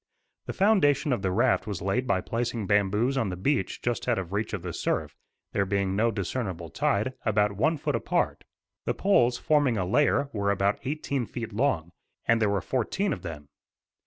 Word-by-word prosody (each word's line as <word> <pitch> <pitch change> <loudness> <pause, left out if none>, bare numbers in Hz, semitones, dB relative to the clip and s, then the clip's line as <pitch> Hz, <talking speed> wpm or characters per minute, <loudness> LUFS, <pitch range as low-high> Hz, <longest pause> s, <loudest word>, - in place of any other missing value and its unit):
The - - -3
foundation 155 -9 +3
of 120 - -1
the 95 - 0
raft 120 +3 +2
was 100 -4 -3
laid 100 +8 -1
by 95 -5 +2
placing 115 -1 -2
bamboos 105 +6 +2
on 110 - 0
the 90 - -3
beach 125 +1 -1
just 120 0 -1
out 120 -2 +2
of 95 -1 -4
reach 105 +2 -1
of 100 -6 -4
the 90 -2 -4
surf, - - -2 0.4
there 100 - +1
being 100 0 0
no 115 +3 +3
discernable 95 -4 -3
tide, 110 +6 0
about 105 -2 +2
one 150 +11 +1
foot - - -1
apart. - - -1 0.4
The - - 0
poles, 125 -12 +3
forming 145 -6 +2
a 95 - 0
layer, 140 +7 +2
were 100 -2 0
about 100 0 +1
eighteen 140 -3 -2
feet 115 -3 -6
long, 105 - 0 0.4
and 115 -1 +3
there 105 - +3
were 100 -1 0
fourteen 190 - -1
of - - -7
them. 80 -5 -7
110 Hz, 190 wpm, -27 LUFS, 95-130 Hz, 0.4 s, foundation